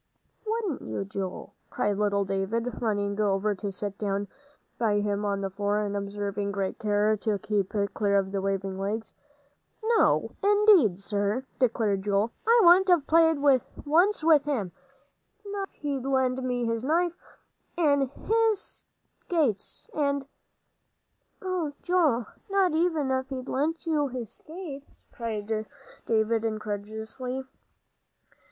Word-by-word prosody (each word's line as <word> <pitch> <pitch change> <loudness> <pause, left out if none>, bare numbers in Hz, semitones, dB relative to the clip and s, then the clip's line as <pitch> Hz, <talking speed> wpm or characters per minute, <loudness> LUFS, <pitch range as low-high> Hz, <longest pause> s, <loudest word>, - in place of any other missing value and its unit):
"Wouldn't 435 - -1
you, 195 - -4
Joel?" 190 -1 -5 0.2
cried 205 - 0
little 200 -1 +1
David, 210 +5 -2
running 205 -2 -1
over 205 0 +1
to 200 +1 -4
sit 200 +1 -5
down 200 -1 -1 0.5
by 215 -3 +2
him 205 0 -1
on 200 -1 -1
the 195 -1 -3
floor, 205 +1 0
and 205 0 -3
observing 200 0 -3
great 195 -1 -3
care 210 0 +2
to 210 0 0
keep 205 -2 -1 0.2
clear 200 -2 +2
of 190 -1 0
the 195 -1 -1
waving 195 -1 -2
legs. 210 +3 -3 0.7
"No, 450 0 +3
indeed, 400 - +5
sir," 205 +5 -1
declared 220 -6 +1
Joel. 205 +3 +1 0.2
"I 470 +1 +6
wouldn't 360 +2 +7
have 350 -6 +4
played 325 -1 +4 0.5
once 345 +5 +3
with 310 -3 +5
him, 235 -12 -1 0.7
not 400 -1 -4
if - - -35
he'd 280 -3 -2
lent 260 -1 +1
me 245 -1 -1
his 230 0 -1
knife. 335 +5 +2 0.6
An' 285 -5 +3
his 445 - -1 0.3
skates 285 - -1
and 280 -2 0 0.6
" - - -47
"Oh, 360 -6 -2
Joel, 315 -10 +2 0.2
not 390 -2 +3
even 320 -4 +1
if 260 0 -1
he'd 260 -1 -5
lent 315 +6 -1
you 305 -3 +1
his 250 -4 -6
skates?" 310 -4 -10
cried 220 -1 -3 0.4
David, 225 0 +2
incredulously. 220 +4 -4
230 Hz, 135 wpm, -27 LUFS, 205-310 Hz, 0.7 s, wouldn't